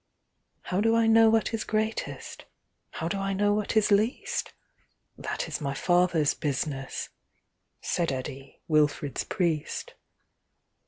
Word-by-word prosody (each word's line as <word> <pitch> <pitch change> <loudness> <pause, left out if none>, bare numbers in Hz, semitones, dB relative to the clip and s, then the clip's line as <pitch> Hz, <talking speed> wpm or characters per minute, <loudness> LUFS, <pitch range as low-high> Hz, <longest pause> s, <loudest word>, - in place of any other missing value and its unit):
"How 185 +2 -1
do 225 +1 +3
I 230 0 +4
know 225 0 +6
what 225 +1 +2
is 225 - -1
greatest, 220 +1 -3 0.4
How 160 - -4
do 195 +3 -2
I 195 0 -1
know 205 +1 +2
what 210 +1 0
is 215 -1 +3
least? 215 +5 +1 0.6
That - - -4
is - - -4
My 140 -1 -2
Father's 175 -3 +3
business,"Said 145 +3 -4
Eddi, 135 +1 -6
Wilfrid's 150 -2 +1
priest. 165 -5 -2
180 Hz, 120 wpm, -27 LUFS, 150-215 Hz, 0.6 s, know